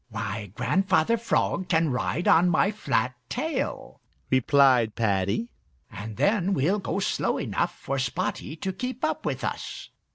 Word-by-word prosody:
"Why, 110 -2 -4
Grandfather 190 - +2
Frog 220 -4 0
can 160 -3 +2
ride 145 +6 -1
on 175 +2 +6
my 175 +4 +3
flat 170 -11 0 0.2
tail," 310 +6 -3 0.3
replied 130 -4 +4
Paddy, 100 +1 0 0.4
"and 105 +1 -7
then 200 -2 +2
we'll 180 +9 +1
go 195 - -3
slow 195 - 0
enough - - -2
for 135 0 -3
Spotty 135 +3 -2
to 190 +4 -4
keep 250 +7 -3
up 310 - -2
with - - -3
us." - - -5
155 Hz, 140 wpm, -26 LUFS, 115-195 Hz, 0.4 s, on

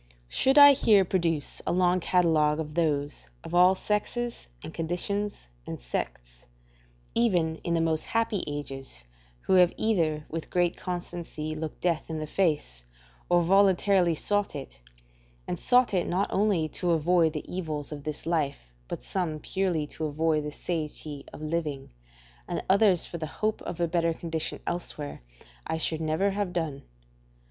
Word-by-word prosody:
Should 265 - +3
I 285 0 +11
here 210 -7 +4
produce 165 -5 -1
a - - +2
long 180 0 +3
catalogue 160 -4 +2
of 150 -1 -4
those, 145 - -1
of - - -8
all 180 +2 +6
sexes 215 - -2
and - - -8
conditions 180 - -2 0.2
and - - -5
sects, - - -6 0.7
even 175 -9 +2
in 170 +1 -2
the 165 - +2
most 160 -1 +1
happy 225 -4 0
ages, 135 - -6 0.4
who - - 0
have 180 -1 +6
either 160 -9 +1
with 165 0 -5
great 175 -1 +1
constancy 175 -3 -5
looked 155 0 -6
death 170 -2 0
in 160 - -3
the 155 - -3
face, 150 - 0 0.5
or 175 0 +4
voluntarily 190 -1 +4
sought 205 +5 -1
it, - - -8 0.7
and - - -3
sought 250 -3 +3
it 180 -2 +1
not 190 +3 0
only 195 -5 +2
to 175 +3 -2
avoid 165 0 +3
the 150 - -5
evils 155 -5 -4
of 145 -1 -7
this 155 0 -5
life, 145 - -2
but - - -6
some 175 -5 -2
purely 175 -1 -1
to 155 +2 -5
avoid 155 +1 +1
the 150 - -4
satiety 150 -3 -4
of 155 - -9
living, 150 - -3 0.5
and 175 - -3
others 195 -3 +4
for 170 - -6
the 155 - -3
hope 215 +7 -2
of 175 - -6
a 170 - +2
better 165 -1 +1
condition 160 -2 -3
elsewhere, 150 - -3 0.5
I - - -1
should 160 0 0
never 160 +6 +1
have 195 -2 -2
done. 155 -5 -3
165 Hz, 160 wpm, -28 LUFS, 150-185 Hz, 0.7 s, I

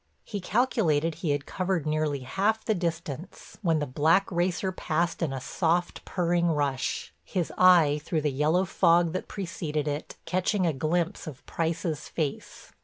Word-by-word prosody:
He 205 -3 -5
calculated 180 - +1
he 165 +1 -4
had 145 0 0
covered 185 -4 -1
nearly 155 -2 0
half 200 +11 0
the 220 - +2
distance 170 -2 -5
when 165 -5 +2
the 150 - 0
black 160 +9 +2
racer 180 +2 0
passed 170 -1 -1
in 160 -5 0
a 135 - -3
soft, 175 +5 0
purring 175 -1 +1
rush, 145 -5 -1
his 180 -4 -2
eye, 165 -5 +5
through 160 -1 -1
the 150 -1 0
yellow 155 +7 +2
fog 170 -2 +3
that 185 - -3
preceded 165 -6 -3
it, 145 +1 -4
catching 185 +1 +1
a 165 - +2
glimpse 170 +6 -1
of 140 -5 -9
Price's 165 -2 -2
face. 150 -4 -4
165 Hz, 160 wpm, -27 LUFS, 150-180 Hz, -, eye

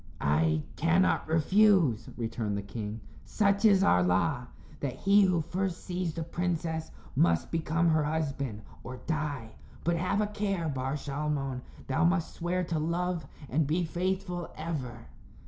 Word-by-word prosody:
"I 80 +1 +2
cannot 165 +3 +3
refuse," 165 - +4
returned 115 -3 -2
the 100 - -4
king. 105 +1 -5 0.2
"Such 200 0 +1
is 195 -3 +6
our 90 - +5
law 95 +7 +1 0.3
that 140 -3 -3
he 200 +1 +4
who 185 -4 +3
first 180 +2 -3
sees 180 -2 -2
the 165 - -2
princess 165 -1 -2 0.3
must 85 -1 +2
become 165 +1 +1
her 155 -1 +3
husband, 140 -8 -2 0.2
or 130 +1 -7
die. 145 -7 -2 0.3
But, 170 0 +1
have 185 +4 0
a 210 - +3
care, 200 -5 -2
Bar 135 -1 -2
Shalmon. 140 -2 -2 0.2
Thou 135 +3 +1
must 170 0 +2
swear 180 +2 -1
to 165 -2 -1
love 170 0 -1 0.2
and 145 +3 +1
be 170 +4 +1
faithful 180 +1 -2
ever." 130 -8 -5
160 Hz, 145 wpm, -30 LUFS, 130-180 Hz, 0.3 s, is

